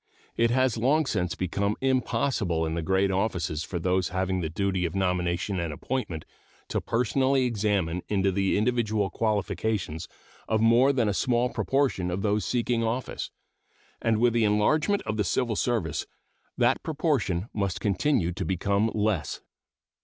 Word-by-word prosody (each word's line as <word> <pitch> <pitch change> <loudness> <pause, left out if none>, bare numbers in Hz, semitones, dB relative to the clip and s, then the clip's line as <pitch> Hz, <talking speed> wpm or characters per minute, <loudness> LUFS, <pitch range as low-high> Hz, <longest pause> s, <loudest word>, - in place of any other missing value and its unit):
It 115 0 +3
has 130 -1 +2
long 145 +7 +2
since 90 -8 -1
become 100 +3 -1
impossible 120 -9 0
in 80 - -2
the 85 - -1
great 95 +3 +1
offices 90 -5 -1
for 85 +4 -4
those 90 0 0
having 95 0 -1
the 80 - -2
duty 95 +2 -1
of 85 0 -2
nomination 90 0 0
and 85 -2 -2
appointment 85 - -4 0.4
to - - -1
personally 130 +3 +1
examine 100 -7 0
into 95 -2 +1
the 95 +1 +1
individual 110 -3 +1
qualifications 105 -5 -1 0.4
of 110 - +1
more 115 +5 +5
than 125 -5 +1
a 105 - +1
small 120 +3 +1
proportion 135 -11 0
of 90 +2 -3
those 105 0 +1
seeking 120 -1 0
office, 120 +3 -3 0.7
and 115 -1 +2
with 120 +1 +3
the 115 -1 +2
enlargement 150 - +2
of 110 0 -3
the 105 - +2
civil 115 +3 0
service 95 - -1 0.5
that - - +3
proportion 140 - 0
must 100 -3 -1
continue 100 - +1
to 90 - -4
become 100 +5 +1
less. 105 -7 -1
105 Hz, 155 wpm, -27 LUFS, 90-120 Hz, 0.7 s, more